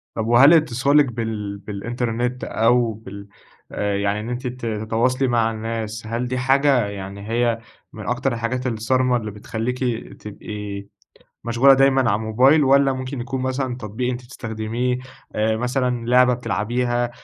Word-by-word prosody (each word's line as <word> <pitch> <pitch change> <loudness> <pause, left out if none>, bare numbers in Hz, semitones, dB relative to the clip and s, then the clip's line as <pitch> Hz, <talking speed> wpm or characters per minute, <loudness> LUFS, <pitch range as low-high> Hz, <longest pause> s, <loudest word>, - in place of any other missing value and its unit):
طب 110 0 -2
وهل 135 +7 +7
اتصالِك 145 -1 +4
بال 110 -4 -4
بالإنترنت 120 +4 -3
أو 115 0 +2
بال 100 -1 -10 0.4
آآ، 105 -1 -1
يعني 100 +1 0
إن 110 +2 -5
أنتِ 125 +1 -3
ت 125 -1 -6
تتواصلي 115 +4 0
مع 115 -2 +2
الناس، 110 0 -5
هل 115 +2 -2
دي 130 +1 -2
حاجة 135 -1 +3
يعني 100 +1 -7
هي 115 0 +1 0.3
من 105 -2 -8
أكتر 125 +1 0
الحاجات 125 +2 -2
الصارمة 125 +2 +1
اللي 110 -3 -5
بتخليكِ 110 +4 -4 0.4
تبقي 105 -1 -7 0.6
مشغولة 120 +4 +5
دايمًا 135 0 +4
على - - +2
الموبايل؟ 125 +8 +4
والَّا 135 0 +4
ممكن 130 0 -5
يكون 130 +2 -3
مثلًا 130 -1 -2
تطبيق 125 +2 -3
أنتِ 125 0 -4
تستخدميه 120 0 -3 0.4
مثلًا 120 +2 0
لعبة 125 0 +5
بتلعبيها، 120 +2 -1
120 Hz, 145 wpm, -22 LUFS, 110-125 Hz, 0.6 s, وهل